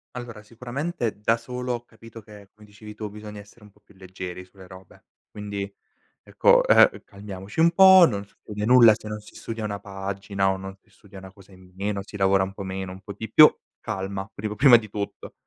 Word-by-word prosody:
Allora 120 Hz, -3 st, -8 dB
sicuramente 120 Hz, -, -5 dB
da 115 Hz, +2 st, +2 dB
solo 125 Hz, +1 st, -5 dB
ho 120 Hz, 0 st, -6 dB
capito 115 Hz, 0 st, -14 dB
che, 105 Hz, -2 st, -15 dB
come 105 Hz, 0 st, -18 dB
dicevi 105 Hz, +1 st, -12 dB
tu, 105 Hz, -1 st, -7 dB
bisogna 105 Hz, 0 st, -10 dB
essere 105 Hz, +2 st, -17 dB
un 105 Hz, -, -18 dB
po' 105 Hz, -, -29 dB
più 100 Hz, -, -23 dB
leggeri 90 Hz, -1 st, -9 dB
sulle 95 Hz, 0 st, -17 dB
robe. 95 Hz, 0 st, -16 dB, 0.3 s
Quindi 100 Hz, -1 st, -6 dB, 0.5 s
ecco, -, -, +3 dB
uhm, -, -, +5 dB
calmiamoci 100 Hz, +3 st, -9 dB
un 170 Hz, +1 st, +5 dB
po', 190 Hz, 0 st, +8 dB
non 100 Hz, -3 st, -4 dB
succede 105 Hz, +1 st, -9 dB
nulla 120 Hz, -3 st, +7 dB
se 110 Hz, -, -12 dB
non 105 Hz, 0 st, -5 dB
si 105 Hz, -, -17 dB
studia 115 Hz, -1 st, -7 dB
una 100 Hz, -1 st, -4 dB
pagina 100 Hz, 0 st, -3 dB
o 95 Hz, -, -3 dB
non 95 Hz, 0 st, -9 dB
si -, -, -33 dB
studia 100 Hz, -2 st, -17 dB
una 95 Hz, 0 st, -11 dB
cosa 100 Hz, -1 st, -19 dB
in 90 Hz, -1 st, -18 dB
meno, 100 Hz, 0 st, -3 dB
si 105 Hz, -, -13 dB
lavora 95 Hz, -1 st, +2 dB
un 95 Hz, 0 st, -6 dB
po' 100 Hz, -, -9 dB
meno, 95 Hz, -1 st, -5 dB
un 95 Hz, +1 st, -11 dB
po' 100 Hz, -, -9 dB
di 110 Hz, +2 st, -8 dB
più, 155 Hz, 0 st, +8 dB, 0.3 s
calma, 95 Hz, -1 st, -5 dB
prim 105 Hz, +1 st, -5 dB
prima 125 Hz, 0 st, +7 dB
di 110 Hz, -2 st, -7 dB
tutto. 100 Hz, 0 st, -7 dB
105 Hz, 215 wpm, -24 LUFS, 95-115 Hz, 0.5 s, po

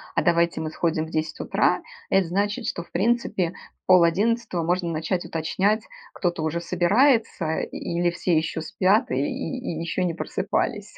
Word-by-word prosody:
"А -, -, +3 dB
давайте 170 Hz, -2 st, +2 dB
мы 155 Hz, -, -3 dB
сходим 160 Hz, -1 st, 0 dB
в -, -, -10 dB
10 160 Hz, 0 st, -2 dB
утра"- -, -, +1 dB, 0.3 s
это 195 Hz, -1 st, +3 dB
значит, 205 Hz, +6 st, -1 dB
что, 170 Hz, -, -3 dB
в -, -, -25 dB
принципе, 190 Hz, -3 st, +1 dB, 0.3 s
в -, -, -69 dB
пол-одиннадцатого 185 Hz, +2 st, +3 dB
можно 175 Hz, +1 st, 0 dB
начать 165 Hz, +3 st, -2 dB
уточнять, 190 Hz, +7 st, 0 dB, 0.3 s
кто-то 175 Hz, -3 st, -1 dB
уже 160 Hz, +2 st, -1 dB
собирается 195 Hz, -, +2 dB
или 175 Hz, +1 st, -1 dB
все 170 Hz, -1 st, 0 dB
еще 160 Hz, 0 st, -1 dB
спят 190 Hz, +4 st, +2 dB
и -, -, +1 dB
и 170 Hz, -, -3 dB
и -, -, -4 dB
еще 175 Hz, +2 st, -1 dB
не 170 Hz, -, -1 dB
просыпались. 165 Hz, -, -2 dB
175 Hz, 165 wpm, -24 LUFS, 165-200 Hz, 0.3 s, А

